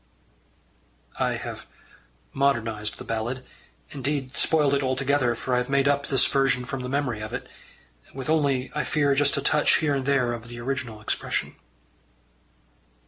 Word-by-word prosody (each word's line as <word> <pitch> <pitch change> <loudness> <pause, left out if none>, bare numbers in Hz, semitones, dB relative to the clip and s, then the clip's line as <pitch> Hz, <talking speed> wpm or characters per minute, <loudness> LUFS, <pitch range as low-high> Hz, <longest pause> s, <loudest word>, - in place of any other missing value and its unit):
I - - +1
have - - -6 0.7
modernized 115 -6 0
the - - -8
ballad 120 +3 -3 0.5
indeed 135 -1 -2
spoiled 150 -3 +3
it 140 - +2
altogether, 130 -1 +1
for 125 +2 -3
I 125 - +4
have 125 - -3
made 140 0 +3
up 140 0 +1
this 135 -2 +4
version 135 -2 +2
from 135 - -4
the 125 0 -5
memory 130 -5 -1
of 110 - -6
it - - -4 0.6
with 135 -1 -6
only, 140 -5 +1
I 150 - -1
fear, 145 -2 +2
just 140 0 +2
a 140 - -2
touch 150 +1 +4
here 150 -3 +1
and 135 -1 -2
there 130 -4 +2
of 120 0 -7
the 120 0 -8
original 120 -3 -4
expression. - - -2
135 Hz, 160 wpm, -25 LUFS, 125-140 Hz, 0.7 s, I